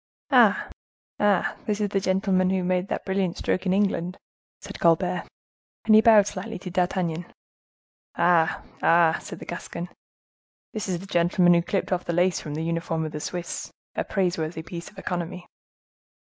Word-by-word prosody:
"Ah! - - +5 0.5
ah! 205 -2 +2
this 210 -1 0
is 205 -1 0
the 195 - +1
gentleman 185 -1 +1
who 190 -1 0
made 180 +1 0
that - - -4
brilliant 190 -2 -1
stroke 185 - -1
in 185 - +2
England," 190 -2 0 0.4
said - - -9
Colbert. 175 +2 +2 0.6
And 220 - +5
he 215 - +8
bowed 220 -3 +7
slightly 210 +2 -5
to 180 0 -8
D'Artagnan. 175 -2 -1 0.8
"Ah! 170 -2 +2 0.2
ah!" 165 -1 +4
said - - -8
the - - -10
Gascon, 175 +1 -6 0.8
"this 215 -3 -4
is 180 - 0
the 185 - -9
gentleman 175 -1 +3
who 170 - +4
clipped 195 +3 -2
off 180 -1 -1
the 170 - -2
lace 175 +1 +2
from 150 -1 -6
the 160 - -3
uniform 165 -1 -2
of 155 - -5
the 150 - -5
Swiss! 175 +2 -5 0.2
A - - -1
praiseworthy 170 -4 -1
piece 170 +1 -8
of 210 - -22
economy." 180 -1 -4
180 Hz, 170 wpm, -25 LUFS, 170-195 Hz, 0.8 s, he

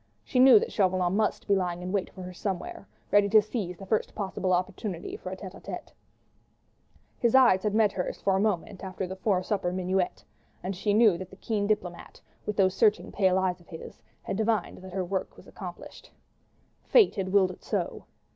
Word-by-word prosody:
She 255 - -1
knew 255 -2 +9
that - - 0
Chauvelin 185 -2 +1
must 215 0 0
be 200 - +4
lying 180 -2 -2
in 180 - -4
wait 195 -2 -1
for 185 - -9
her 180 0 -7
somewhere, 190 +1 -5 0.2
ready 205 0 +5
to 215 +1 +7
seize 205 -4 -3
the 195 - -9
first 215 +3 -1
possible 190 -2 -2
opportunity 180 0 -2
for 185 - -7
a 190 - -5
tête 190 -2 -8
à - - -13
tête. - - -7 1.3
His 235 +1 +2
eyes 240 -8 +6
had 210 0 -1
met 215 -2 +4
hers 180 - -4
for 195 - +1
a - - +2
moment 200 -2 -1
after 190 0 -4
the 185 +1 -6
'fore 190 -1 0
supper 195 -3 -1
minuet, 185 0 -1 0.4
and 190 +2 -3
she 205 +3 0
knew 215 -6 +5
that 185 -1 -7
the 190 - -13
keen 205 0 -2
diplomatist, 180 -5 -3 0.2
with 210 - -2
those 190 -2 +4
searching 210 +1 +2
pale 190 -2 +2
eyes 185 -1 0
of 175 - -22
his, 160 - -10 0.2
had - - -3
divined 220 0 0
that 185 0 -11
her 185 -1 -1
work 190 +1 -3
was - - -15
accomplished. - - -10 0.7
Fate 450 -6 +5
had 190 -2 -3
willed 190 -2 +4
it - - -14
so. - - -3
190 Hz, 205 wpm, -28 LUFS, 185-210 Hz, 1.3 s, knew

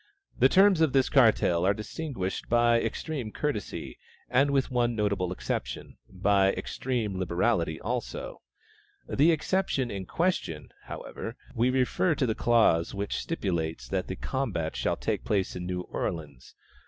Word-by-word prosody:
The 130 - +6
terms 190 -1 +5
of 155 -4 +3
this 135 -1 +3
cartel 110 -9 +4
are 100 +2 +3
distinguished 110 -3 -4
by 120 0 +4
extreme 120 0 -3
courtesy, 145 -7 -4 0.3
and 135 +3 +4
with 140 -1 +1
one 120 -1 +1
notable 100 -4 0
exception, 65 -8 -4
by 95 +1 +3
extreme 115 -7 -3
liberality 85 -2 0
also. 120 +3 -4 0.7
The 155 +5 +4
exception 160 -6 0
in 95 -2 -5
question, 165 - -1 0.2
however, 115 - -7 0.2
(we 120 +1 +2
refer 130 +6 +2
to 140 - +1
the 110 - +1
clause 110 -8 +3
which 100 +1 -2
stipulates 85 - -2
that 95 -1 -1
the 95 - -4
combat 100 -14 -2
shall - - 0
take - - -2
place 95 -2 0
in 90 0 -5
New 90 0 -2
Orleans!) 75 -7 -5
110 Hz, 140 wpm, -28 LUFS, 95-130 Hz, 0.7 s, The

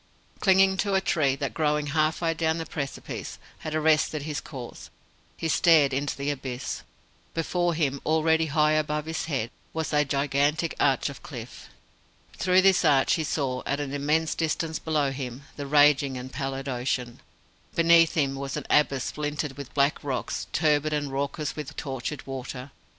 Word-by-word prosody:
Clinging 190 0 +4
to 200 -1 +1
a - - +5
tree 145 -7 +1
that, 140 0 -3
growing 150 -1 +1
half 155 +1 +1
way 165 -1 +1
down 160 0 0
the 165 - -4
precipice, 140 -4 -5 0.2
had 155 0 -4
arrested 155 -1 +2
his 150 -1 -3
course, 130 -5 -9 0.5
he 165 - -2
stared 155 -4 +5
into 140 +2 -1
the 140 +1 -1
abyss. 130 -2 -5 0.5
Before 175 +1 0
him 140 -4 0
already 160 +1 +2
high 150 +1 +3
above 150 0 0
his 160 0 -3
head 130 -7 -2 0.2
was 160 -1 -3
a 150 0 +4
gigantic 145 +3 +1
arch 135 -3 +2
of 140 - -10
cliff. 120 -5 -9 0.7
Through 185 0 +3
this 190 -2 +5
arch 135 -2 +4
he 160 - 0
saw, 135 -4 -1
at 140 - 0
an 140 -1 -4
immense 155 +3 +1
distance 160 0 -1
below 150 -4 0
him, 130 -1 -6
the 145 -1 -5
raging 145 -2 +4
and 130 +1 -7
pallid 135 0 -4
ocean. 125 -1 -2 0.6
Beneath 165 -1 +5
him 140 -4 +1
was 135 0 -4
an - - -5
abyss 140 -3 +3
splintered 150 -1 -3
with 140 -2 -8
black 140 +1 +2
rocks, 135 -3 -3
turbid 155 -1 +2
and 145 -2 -1
raucous 140 +2 -2
with 150 - -6
tortured 135 0 -5
water. 135 0 -6
150 Hz, 165 wpm, -26 LUFS, 135-160 Hz, 0.7 s, a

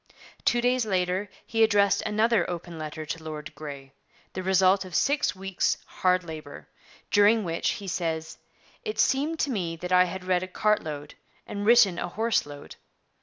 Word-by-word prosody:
Two 240 - +3
days 250 0 +2
later 185 -1 -1 0.2
he 225 0 +2
addressed 200 -2 +3
another 215 -2 +2
open 170 -1 -6
letter 155 0 -6
to 160 +1 -5
Lord 155 -1 -7
Grey, 140 -3 -9 0.4
the 185 - -4
result 190 +1 +3
of 185 -4 -8
six 285 - +2
weeks' 195 0 -1
hard 185 0 +1
labour, 160 -2 -9 0.4
during 210 +2 +5
which, 165 -2 -1
he 205 -4 -8
says, 160 -3 -3 0.4
'it 430 -1 -4
seemed 295 +5 +2
to 280 - 0
me 175 -7 -2
that 180 +2 -7
I 180 0 +6
had 185 +1 -6
read 180 -1 +2
a 185 - -4
cart 210 +3 +1
load 150 -1 -6 0.3
and 205 0 -4
written 225 -7 +6
a - - -2
horse 220 0 0
load.' 145 -1 -11
185 Hz, 170 wpm, -26 LUFS, 165-210 Hz, 0.4 s, I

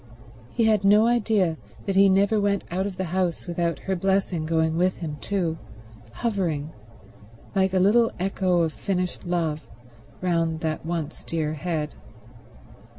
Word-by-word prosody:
He 230 - 0
had 215 -3 +3
no 210 +2 +6
idea 215 -8 +2 0.3
that 195 - -1
he 195 0 +6
never 200 +3 +3
went 200 -1 +1
out 190 +3 0
of 190 -3 -7
the 190 - -1
house 180 -3 0
without 170 -2 -1
her 190 - -1
blessing 190 -3 0
going 160 0 +1
with 180 +2 +1
him 155 -4 -5
too, 170 -5 -1 0.5
hovering, 160 - -2 0.8
like 190 -2 +2
a - - +4
little 225 +5 +4
echo 185 -2 +1
of 160 -2 -1
finished 180 -2 -3
love, 165 -3 0 0.6
round 165 -3 0
that 160 -1 -2
once 165 -3 -4
dear 155 -2 -2
head. 155 -1 -2
180 Hz, 150 wpm, -25 LUFS, 165-195 Hz, 0.8 s, no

